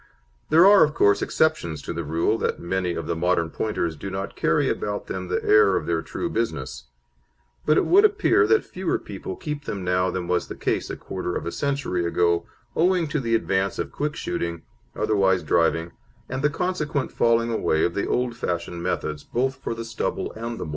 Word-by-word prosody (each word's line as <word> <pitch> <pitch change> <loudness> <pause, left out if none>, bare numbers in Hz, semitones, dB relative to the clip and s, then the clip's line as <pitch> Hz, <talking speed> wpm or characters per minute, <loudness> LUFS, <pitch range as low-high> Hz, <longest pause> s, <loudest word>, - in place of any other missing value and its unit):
There 165 +3 +7
are, 200 0 +8
of 150 0 0
course, 100 0 +4
exceptions 85 - 0
to - - -4
the 85 - -3
rule 85 +9 0
that - - -1
many 90 0 -1
of 85 - -4
the 85 - -2
modern 85 -1 +1
Pointers 85 -7 -2
do 95 +6 -6
not 95 +1 -5
carry - - +2
about 105 0 -2
them 95 -1 -5
the 90 0 -1
air 105 -3 +5
of - - -1
their 85 -1 0
true - - -4
business; 65 - -3 0.8
but 155 - +5
it - - +3
would 395 +3 +6
appear 415 -1 +4
that 440 - +3
fewer - - -2
people 385 -1 -7
keep 150 - -5
them 100 -3 -4
now 90 +1 +1
than 90 -2 -3
was 90 0 0
the - - -7
case - - -1
a - - -5
quarter 90 -2 -4
of - - -3
a 85 - -2
century 140 -11 -1
ago, 85 0 +1 0.3
owing 175 0 +2
to 150 - 0
the 115 -3 +1
advance 100 -3 0
of - - -3
quick 150 +1 -2
shooting, 85 - -3 0.3
otherwise 95 -4 +2
driving, 80 +2 +1 0.4
and 130 +1 -3
the 150 - +3
consequent 150 -4 -2
falling 115 0 +2
away 80 -8 +1
of 85 - -1
the 100 - -1
old 125 -1 0
fashioned 85 -2 -3
methods, 75 -4 -2
both 130 +2 -1
for 115 - -2
the 115 0 -6
stubble 115 - -3
and 115 +1 -5
the - - -4
moor. - - -7
100 Hz, 205 wpm, -24 LUFS, 85-135 Hz, 0.8 s, are